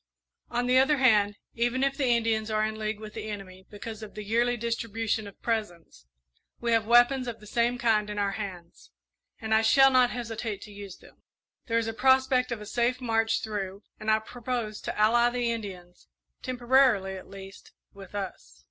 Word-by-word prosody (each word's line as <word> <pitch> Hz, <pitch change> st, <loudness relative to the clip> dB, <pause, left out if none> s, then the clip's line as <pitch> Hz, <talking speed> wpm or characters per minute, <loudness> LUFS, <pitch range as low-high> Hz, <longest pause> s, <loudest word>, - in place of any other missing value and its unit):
"On 245 Hz, 0 st, -1 dB
the 255 Hz, +1 st, +4 dB
other 290 Hz, +3 st, +3 dB
hand, 210 Hz, -6 st, +3 dB, 0.2 s
even 240 Hz, +3 st, 0 dB
if 275 Hz, 0 st, +1 dB
the 270 Hz, -, 0 dB
Indians 225 Hz, -2 st, +1 dB
are 215 Hz, 0 st, +1 dB
in 215 Hz, 0 st, -4 dB
league 215 Hz, -1 st, -3 dB
with 215 Hz, -1 st, -9 dB
the 215 Hz, -1 st, -6 dB
enemy 190 Hz, -2 st, -8 dB
because 215 Hz, +1 st, -8 dB
of 215 Hz, -, -10 dB
the 210 Hz, -, -6 dB
yearly 240 Hz, +3 st, +1 dB
distribution 225 Hz, -2 st, -2 dB
of 200 Hz, -, -13 dB
presents, 175 Hz, -, -4 dB, 0.5 s
we 235 Hz, 0 st, -1 dB
have 225 Hz, -2 st, +2 dB
weapons 245 Hz, +2 st, +4 dB
of 230 Hz, -1 st, -5 dB
the 210 Hz, -, -14 dB
same 235 Hz, +3 st, 0 dB
kind 220 Hz, -3 st, +1 dB
in 210 Hz, -, -5 dB
our 200 Hz, -1 st, +1 dB
hands, 185 Hz, -5 st, -8 dB, 0.5 s
and 220 Hz, 0 st, -2 dB
I 220 Hz, -, +5 dB
shall 270 Hz, +4 st, +6 dB
not 255 Hz, -1 st, +5 dB
hesitate 225 Hz, -4 st, -5 dB
to 210 Hz, -, -11 dB
use 200 Hz, -2 st, -9 dB
them. -, -, -20 dB, 0.5 s
There 230 Hz, -1 st, +1 dB
is 230 Hz, -, +1 dB
a 225 Hz, -, -3 dB
prospect 260 Hz, 0 st, +3 dB
of 235 Hz, -, -3 dB
a -, -, -8 dB
safe 240 Hz, +3 st, 0 dB
march 225 Hz, -2 st, 0 dB
through, 200 Hz, -2 st, -4 dB, 0.2 s
and 215 Hz, -, -3 dB
I 215 Hz, -, +5 dB
propose 230 Hz, -1 st, -4 dB
to -, -, -5 dB
ally 235 Hz, +3 st, +4 dB
the 240 Hz, -1 st, -1 dB
Indians, 185 Hz, -6 st, -8 dB, 0.3 s
temporarily 245 Hz, -6 st, +2 dB
at 190 Hz, -, -9 dB
least, 195 Hz, 0 st, -11 dB, 0.2 s
with 195 Hz, 0 st, -12 dB
us." 195 Hz, -, -6 dB
225 Hz, 190 wpm, -27 LUFS, 205-240 Hz, 0.5 s, shall